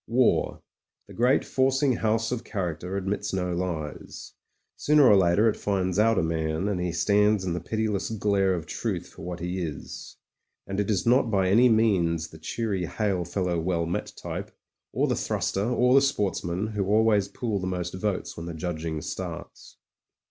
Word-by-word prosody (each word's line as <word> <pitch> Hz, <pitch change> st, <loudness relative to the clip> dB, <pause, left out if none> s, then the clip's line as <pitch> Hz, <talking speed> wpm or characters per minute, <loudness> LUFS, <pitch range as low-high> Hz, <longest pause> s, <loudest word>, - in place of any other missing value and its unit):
War, 120 Hz, +2 st, +1 dB, 0.4 s
the -, -, -12 dB
great 125 Hz, +4 st, +2 dB
forcing 135 Hz, -1 st, +2 dB
house 110 Hz, +1 st, 0 dB
of 125 Hz, -2 st, -2 dB
character, 90 Hz, -3 st, -4 dB
admits 100 Hz, +1 st, -2 dB
no 90 Hz, -1 st, -1 dB
lies. 85 Hz, -4 st, -5 dB, 0.4 s
Sooner 150 Hz, -1 st, +4 dB
or 105 Hz, -, +7 dB
later 95 Hz, +3 st, +4 dB
it 110 Hz, -, +2 dB
finds 95 Hz, -2 st, -1 dB
out 115 Hz, 0 st, +4 dB
a 95 Hz, -, +2 dB
man, 80 Hz, +2 st, -1 dB
and 95 Hz, -4 st, -1 dB
he 90 Hz, -1 st, -1 dB
stands 105 Hz, +3 st, +2 dB
in 90 Hz, -, -1 dB
the 90 Hz, -, -2 dB
pitiless 105 Hz, +3 st, -2 dB
glare 100 Hz, -3 st, +1 dB
of 85 Hz, -3 st, -5 dB
truth -, -, -4 dB
for -, -, -14 dB
what 90 Hz, +1 st, -5 dB
he 90 Hz, +2 st, -3 dB
is. 80 Hz, -5 st, -7 dB, 0.5 s
And 95 Hz, +1 st, -4 dB
it 105 Hz, -, -1 dB
is 95 Hz, -4 st, 0 dB
not 120 Hz, 0 st, +4 dB
by 95 Hz, -3 st, +2 dB
any 120 Hz, +6 st, +6 dB
means 90 Hz, -8 st, +2 dB
the 80 Hz, -, -13 dB
cheery 95 Hz, +1 st, -2 dB
hail 100 Hz, -3 st, -1 dB
fellow 90 Hz, -1 st, -1 dB
well 85 Hz, 0 st, 0 dB
met 85 Hz, -, -3 dB
type, -, -, -5 dB, 0.4 s
or -, -, +1 dB
the -, -, 0 dB
thruster, 100 Hz, +1 st, -1 dB
or 125 Hz, +1 st, +3 dB
the 135 Hz, -, +7 dB
sportsman, 100 Hz, -8 st, -1 dB
who 105 Hz, -3 st, -2 dB
always 105 Hz, -1 st, +3 dB
pool 110 Hz, -1 st, -3 dB
the 95 Hz, -, -3 dB
most 90 Hz, -2 st, -3 dB
votes 95 Hz, +1 st, -3 dB
when 85 Hz, 0 st, -7 dB
the 85 Hz, -, -5 dB
judging 80 Hz, -1 st, -4 dB
starts. -, -, -7 dB
95 Hz, 180 wpm, -26 LUFS, 85-110 Hz, 0.5 s, or